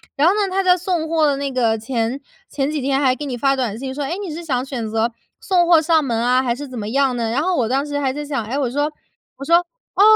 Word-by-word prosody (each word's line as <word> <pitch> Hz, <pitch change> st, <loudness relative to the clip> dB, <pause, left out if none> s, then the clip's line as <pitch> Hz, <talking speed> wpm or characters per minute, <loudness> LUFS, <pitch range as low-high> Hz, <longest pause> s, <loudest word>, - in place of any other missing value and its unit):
然 295 Hz, +4 st, +3 dB
后 375 Hz, -, +5 dB
呢， -, -, 0 dB
它 385 Hz, +1 st, 0 dB
在 365 Hz, 0 st, +5 dB
送 350 Hz, -3 st, -1 dB
货 320 Hz, -2 st, +3 dB
的 285 Hz, -1 st, +2 dB
那 280 Hz, -1 st, -3 dB
个 230 Hz, -3 st, +1 dB
前 230 Hz, +3 st, -2 dB, 0.3 s
前 275 Hz, 0 st, -1 dB
几 300 Hz, -3 st, -2 dB
天 270 Hz, +1 st, +1 dB
还 260 Hz, -2 st, +3 dB
给 295 Hz, -, -6 dB
你 255 Hz, -3 st, -3 dB
发 275 Hz, +2 st, +2 dB
短 235 Hz, -5 st, -2 dB
信 265 Hz, +1 st, -5 dB
说： 290 Hz, +1 st, -3 dB
“诶， 340 Hz, -, -2 dB
你 320 Hz, -, -5 dB
是 340 Hz, +2 st, -6 dB
想 255 Hz, -5 st, -1 dB
选 240 Hz, -5 st, -4 dB
择 225 Hz, +2 st, 0 dB, 0.3 s
送 355 Hz, -3 st, +2 dB
货 330 Hz, -3 st, +6 dB
上 320 Hz, -1 st, +3 dB
门 235 Hz, -4 st, -1 dB
啊， 250 Hz, +2 st, +3 dB
还 240 Hz, -2 st, 0 dB
是 290 Hz, +1 st, -7 dB
怎 255 Hz, -2 st, -8 dB
么 205 Hz, -, -4 dB
样 270 Hz, 0 st, +2 dB
呢？” 225 Hz, -1 st, -1 dB
然 275 Hz, +5 st, +1 dB
后 365 Hz, +1 st, +1 dB
我 235 Hz, -3 st, +1 dB
当 270 Hz, +4 st, 0 dB
时 290 Hz, -1 st, -3 dB
还 265 Hz, -2 st, 0 dB
在 295 Hz, +1 st, -4 dB
想， 275 Hz, -7 st, -3 dB
哎， 260 Hz, +6 st, -3 dB
我 265 Hz, -4 st, 0 dB
说 290 Hz, +4 st, -1 dB, 0.5 s
我 275 Hz, -, -8 dB
说， 335 Hz, +2 st, +6 dB
哦， 370 Hz, +3 st, -4 dB
275 Hz, 305 characters per minute, -20 LUFS, 250-315 Hz, 0.5 s, 货